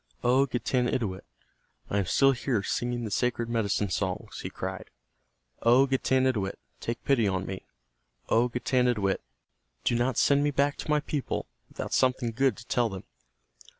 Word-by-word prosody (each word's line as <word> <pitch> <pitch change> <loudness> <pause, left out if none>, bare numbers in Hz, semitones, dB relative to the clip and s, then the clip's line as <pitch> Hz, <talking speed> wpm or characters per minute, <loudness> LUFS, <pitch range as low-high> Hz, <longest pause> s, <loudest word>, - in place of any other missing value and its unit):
"O 130 +3 +4
Getanittowit, 120 -5 -1 0.7
I 100 - +2
am 95 - -1
still 135 +6 +5
here 120 -4 -1
singing 120 +3 -2
the 110 - -4
sacred 120 +1 0
medicine 105 -4 0
songs," 95 -1 -3
he - - -5
cried. - - -6 0.7
"O 125 +4 +6
Getanittowit, 130 -6 +1 0.2
take 115 0 -4
pity 120 -6 +3
on 95 -1 -1
me. 95 0 -7 0.6
O 120 +2 +3
Getanittowit, 120 -5 +1 0.6
do - - +2
not 120 +1 +1
send 140 0 +4
me 145 - +2
back 145 0 +1
to - - -7
my 150 0 +3
people 145 -2 -3 0.2
without - - -5
something 125 -2 +2
good 130 0 +1
to 110 - -11
tell 120 -1 +1
them. 95 -2 -7
120 Hz, 150 wpm, -28 LUFS, 105-130 Hz, 0.7 s, O